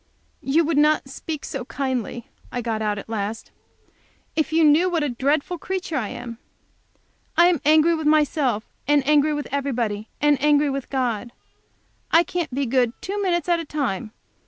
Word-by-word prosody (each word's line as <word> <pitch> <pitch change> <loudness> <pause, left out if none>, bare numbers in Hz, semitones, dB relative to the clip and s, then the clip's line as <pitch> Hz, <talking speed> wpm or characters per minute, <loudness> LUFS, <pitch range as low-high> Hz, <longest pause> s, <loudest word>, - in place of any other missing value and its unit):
"You 310 +5 +2
would 305 -2 +1
not 300 -2 +3
speak 300 +2 -6
so 270 - -5
kindly," 255 -3 -3 0.2
I 245 - -3
got 220 -2 -2
out 210 -1 -1
at 200 - -7
last, 220 0 -4 0.8
"if 315 -1 0
you 325 +1 +3
knew 310 +4 +5
what 335 -4 0
a 295 - 0
dreadful 285 +7 0
creature 370 -3 -4
I 245 -7 -1
am. 235 -1 -7 1.0
I 340 - +7
am 350 -5 +3
angry 310 +3 +5
with 315 -2 -1
myself, 290 -7 +2 0.2
and 290 -2 +3
angry 300 0 +4
with 295 - -4
everybody, 235 -7 -2
and 290 -2 +3
angry 295 -1 +3
with 275 -1 -4
God. 240 -4 -2 0.8
I 330 - +5
can't 345 -3 -3
be 275 +2 -1
good 245 -1 +1
two 405 +2 -4
minutes 350 -4 0
at 345 -1 +2
a - - -3
time. 245 -9 -3
285 Hz, 175 wpm, -23 LUFS, 245-315 Hz, 1.0 s, I